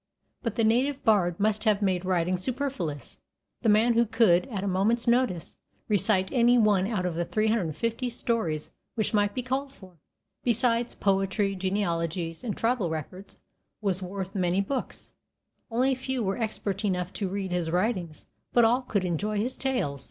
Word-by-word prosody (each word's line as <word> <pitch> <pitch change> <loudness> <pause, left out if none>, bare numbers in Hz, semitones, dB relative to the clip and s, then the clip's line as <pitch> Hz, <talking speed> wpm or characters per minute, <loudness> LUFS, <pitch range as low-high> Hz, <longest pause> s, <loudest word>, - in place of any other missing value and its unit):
But 230 -4 -3
the 230 - +1
native 255 +5 +2
bard 185 -6 +3
must 215 +1 +1
have 210 -2 +3
made 185 -2 0
writing 180 -1 +1
superfluous. 185 - -4 0.4
The 230 - +2
man 220 +3 +4
who 235 0 +3
could, 210 -2 +3
at 205 -7 -4
a - - -1
moment's 205 +5 +1
notice, 235 -8 +1 0.3
recite 195 -2 +2
any 245 -1 +4
one 205 -4 +3
out 205 -5 -1
of 180 - -1
the 170 +1 -1
350 220 - -1
stories 225 -10 -2 0.2
which 220 -1 -1
might 205 -1 +2
be 250 - -2
called 265 +2 -2
for, 185 - -16 0.4
besides 235 0 +1
poetry, 195 +1 +1
genealogies, 170 -3 -2
and 220 -5 -3
tribal 230 -6 +1
records, 180 +5 -7 0.4
was 195 -3 0
worth 190 +1 -5
many 185 -1 +1
books. 250 +7 -4 0.6
Only 250 +3 +2
a - - +1
few 260 -1 -2
were 195 -1 0
expert 210 -3 -3
enough 185 -2 -1
to 195 -3 -2
read 195 -1 -3
his 175 -2 -1
writings, 180 -3 -1 0.3
but 240 -1 +6
all 245 +3 +3
could 205 -7 -1
enjoy 205 +5 -1
his 240 +5 -1
tales. 245 - -1
205 Hz, 165 wpm, -27 LUFS, 185-235 Hz, 0.6 s, but